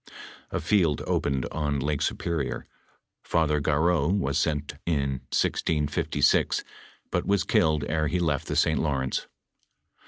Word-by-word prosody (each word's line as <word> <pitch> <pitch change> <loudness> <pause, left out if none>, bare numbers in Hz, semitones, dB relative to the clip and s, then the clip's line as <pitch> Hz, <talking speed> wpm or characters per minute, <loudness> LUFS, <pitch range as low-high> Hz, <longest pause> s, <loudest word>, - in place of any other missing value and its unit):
A - - -2
field 85 -3 +2
opened 65 -3 0
on 75 -2 -1
Lake 75 +1 -1
Superior. 80 -5 -2 0.6
Father 75 -3 +1
Garreau 80 +1 +2
was 100 +2 +1
sent 75 -1 -1
in 70 -5 0
1656, 75 -2 +1 0.5
but - - -1
was 100 -2 +2
killed 75 -2 +2
ere 80 0 0
he 90 - 0
left 75 -5 0
the - - -2
St. - - +3
Lawrence. 65 -4 -1
75 Hz, 125 wpm, -26 LUFS, 70-80 Hz, 0.6 s, St